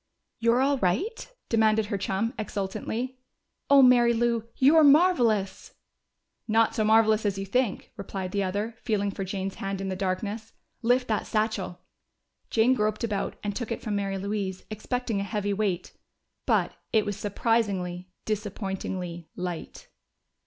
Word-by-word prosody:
"You're 235 +2 +3
all 275 0 +2
right?" 250 - -1 0.2
demanded 220 -1 +3
her 205 -1 -2
chum 195 +4 -1
exultantly. 220 +5 -3 0.5
"Oh, 280 -1 +8
Mary 240 -2 +6
Lou, 235 -1 +1
you're 305 +4 +6
marvelous!" 250 - +3 0.7
"Not 225 0 +3
so 215 - 0
marvelous 220 0 +4
as 200 -2 0
you 195 - -3
think," 240 +1 -1
replied 195 -2 -5
the 200 - 0
other, 205 +4 -2
feeling 205 -2 0
for 195 - -4
Jane's 190 0 -3
hand 195 0 -3
in 195 0 -3
the 190 - -2
darkness. 200 +4 -3 0.3
"Lift 250 +2 +2
that 215 - 0
satchel!" 215 -5 -1 0.7
Jane 230 +3 +4
groped 215 -2 0
about, 210 -4 -2
and 205 -1 -2
took 240 -2 -4
it 230 - -4
from 210 -2 -2
Mary 195 -1 -1
Louise, 195 -1 -3
expecting 230 0 -2
a - - -1
heavy 205 0 -2
weight. 195 -4 -2 0.5
But - - +2 0.2
it 220 -2 +3
was 205 -1 -2
surprisingly, 200 -4 -1 0.2
disappointingly 190 -5 -4
light! 180 -2 -6
210 Hz, 145 wpm, -27 LUFS, 195-230 Hz, 0.7 s, Oh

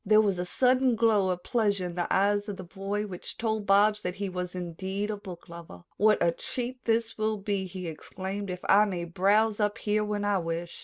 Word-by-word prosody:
There 215 +1 +5
was 200 -4 +2
a 180 - -2
sudden 255 +3 +3
glow 215 -4 +3
of 180 -1 -2
pleasure 205 -6 +1
in 175 - -4
the 175 0 -2
eyes 205 +2 +2
of 200 - -5
the 185 - -7
boy 195 +3 -3
which 185 -4 -8
told 220 -2 -1
Bobs 210 +2 +4
that 180 -2 -3
he 200 -1 -3
was 180 0 -4
indeed 190 +4 -3
a - - -2
booklover. 170 - -10
"What 215 +2 +5
a 170 - +4
treat 250 +7 -5
this 225 -1 0
will 215 0 0
be," 200 -1 -2
he 185 0 -7
exclaimed, 190 +5 -5
"if 180 0 -5
I 205 +2 +6
may 180 -4 -3
browse 205 +5 +2
up 210 +1 +1
here 210 -1 0
when 210 -1 -2
I 205 -1 +2
wish." 170 0 -4
200 Hz, 215 wpm, -28 LUFS, 180-215 Hz, -, I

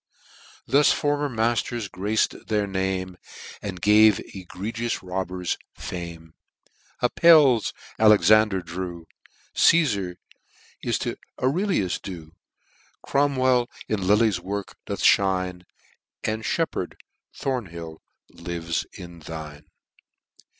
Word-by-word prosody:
Thus 145 +2 +4
former 145 0 0
matters 115 -1 -1
grac'd 105 +4 -1
their 105 -2 +1
name. 95 -1 -2 0.4
And 95 -3 -5
gave 105 +1 +6 0.2
egregious 105 +6 -4
robbers 90 -1 -3 0.2
fame.jj 85 -2 -7 0.7
Appelles, 145 -6 +5 0.3
Alexander 110 -2 +5
drew, 85 -1 -6 0.5
Casfar 105 - +3 0.7
is - - 0
to - - -3 0.2
Aurellius 140 - 0
due, 85 -5 -8 0.7
Cromwell 130 -3 +2 0.2
in 100 -4 -1
Lely's 105 -2 +3
works 100 +2 -5
doth - - -2
mine, 90 -2 -2 0.6
And 110 +1 -2
Sheppard, 110 - -2 0.4
Thornhill, 85 -12 -4 0.3
lives 85 -1 -4
in 85 -2 -10
thine.' 75 -2 -8
100 Hz, 90 wpm, -24 LUFS, 90-115 Hz, 0.7 s, gave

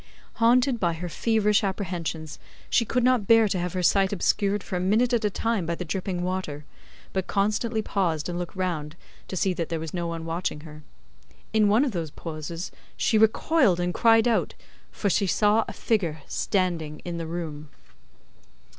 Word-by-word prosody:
Haunted 245 +2 +4
by 170 -4 +1
her 170 +2 -5
feverish 210 +3 +2
apprehensions, 175 -5 -3 0.3
she 230 - +3
could 250 +2 0
not 250 -5 +3
bear 225 -1 +6
to 190 -2 -1
have 175 0 -3
her 185 -1 -2
sight 195 +2 +3
obscured 200 +1 +1
for - - -5
a - - -1
minute 220 +7 +2
at 235 -2 +2
a 210 - +2
time 225 0 -1
by 170 - -1
the 180 - -5
dripping 180 +1 -3
water, 180 -6 -3 0.5
but 190 -2 -1
constantly 215 +2 0
paused 170 -8 -1
and 175 0 -3
looked 175 +3 -6
round 165 -5 -3 0.3
to - - -5
see 185 +1 +1
that 170 -2 -3
there 165 -1 -2
was 160 -1 -6
no 175 -2 -2
one 165 -1 -5
watching 165 -2 -3
her. 150 -1 -11 0.7
In 215 -1 +4
one 225 +7 +4
of 265 - -1
those 170 -5 -3
pauses 165 +3 -6 0.3
she 220 - +2
recoiled 220 - +3
and 175 0 -1
cried 225 -1 +4
out, 230 -2 +1 0.4
for 205 - -2
she 200 +1 +2
saw 210 +4 +3
a - - -5
figure 170 -9 -1
standing 170 -6 -1
in 175 -1 -4
the 165 - -4
room. 155 -3 -5
185 Hz, 185 wpm, -26 LUFS, 165-215 Hz, 0.7 s, bear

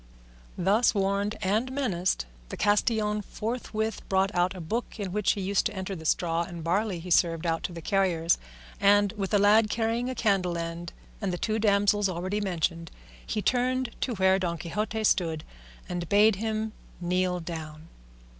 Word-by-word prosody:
Thus 205 +7 +3
warned 200 +1 0
and 215 +7 +1
menaced, 190 - 0 0.2
the - - -6
castellan 210 0 +2
forthwith 220 0 -3
brought 195 +1 +2
out 180 +1 +1
a - - -7
book 225 +8 -4
in 195 -3 -3
which 210 0 +2
he 200 - -4
used 195 +3 +1
to 220 - -8
enter 190 +1 -4
the 160 -2 -9
straw 165 0 +1
and 170 -1 -6
barley 190 +3 0
he 175 +2 -8
served 165 0 +3
out 165 -1 0
to - - -3
the 170 -1 -8
carriers, 175 -4 +2 0.4
and, 205 0 +4
with 195 -2 -4
a 210 - +4
lad 210 +2 +5
carrying 230 +3 0
a 255 - -3
candle 195 -6 +1
end, 170 +1 -5 0.3
and 200 -3 -1
the 175 - -2
two 220 +4 -1
damsels 205 -1 +3
already 185 +4 -2
mentioned, 170 -3 -1 0.3
he 215 - -2
returned 255 +1 +1
to 245 - -1
where 190 0 +3
Don 170 -2 -1
Quixote 210 +6 -3
stood, 165 -7 +1 0.4
and 175 -2 -4
bade 205 0 +5
him 220 +1 -2 0.3
kneel 180 +1 0
down. 160 -2 -7
195 Hz, 175 wpm, -27 LUFS, 175-215 Hz, 0.4 s, lad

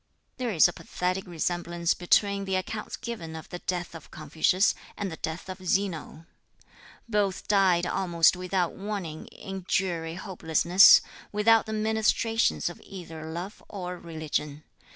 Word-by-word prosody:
There 250 -2 -2
is 180 -7 +6
a 175 - -5
pathetic 185 +1 -3
resemblance 175 0 -1
between 200 +2 +2
the 190 -1 -1
accounts 210 +3 -4
given 215 -9 -6
of 160 - -9
the 180 - -6
death 175 -1 -3
of 165 -2 -11
Confucius 160 +6 +2 0.2
and 200 -3 -3
the 160 - -7
death 160 +3 -5
of 185 0 -8
Zeno. 175 -4 -1 0.8
Both 205 -4 0
died 190 -4 +3
almost 175 -2 +3
without 180 -1 -1
warning 195 -6 -5
in 195 -1 -8
dreary 170 -3 -1
hopelessness, 180 -1 +5 0.3
without 220 +2 +4
the 220 - -4
ministrations 220 +1 +1
of 175 - -6
either 165 -4 -8
love 175 +5 -6
or 180 -3 -6
religion. 155 -2 -4
180 Hz, 140 wpm, -27 LUFS, 165-200 Hz, 0.8 s, is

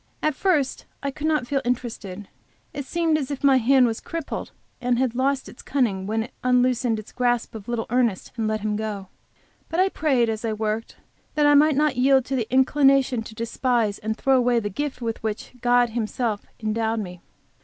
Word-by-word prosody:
At 305 - +2
first 295 -4 0 0.2
I 280 - -1
could 300 +3 -3
not 305 -5 +1
feel 275 +2 0
interested. 225 -6 -4 0.5
It 285 -2 -5
seemed 325 0 +1
as 270 - -4
if 285 -1 -5
my 275 -2 +6
hand 255 +1 +5
was 225 -1 -1
crippled 330 -3 -5 0.3
and 245 0 +1
lost 265 +2 0
its - - -12
cunning 205 -9 0
when 220 +1 0
it 235 - -11
unloosed 250 0 +2
its 215 - -9
grasp 245 -1 0
of 215 -3 -9
little 240 -1 -2
Ernest, 240 -6 +1
and 225 -2 -1
let 215 0 -1
him 210 0 -1
go. 210 -3 -4 0.6
But 330 - -1
I 380 +1 +4
prayed, 270 -9 +1
as 220 0 -3
I 225 -1 -1
worked, 215 +1 -3 0.4
that 300 -1 +3
I 290 - +6
might 300 +1 +5
not 295 -2 +2
yield 265 0 +4
to 270 - -2
the 235 -4 -2
inclination 265 -1 +4
to 220 0 -10
despise 230 -2 0
and 220 +1 -3
throw 270 -1 +3
away 245 -1 +3
the 205 -2 -4
gift 275 +3 -4
with 225 -1 -3
which 220 -1 -4
God 245 -1 +4
has - - -14
Himself 225 -1 -2
endowed 220 +1 -1
me. 180 -4 -7
245 Hz, 200 wpm, -24 LUFS, 220-275 Hz, 0.6 s, my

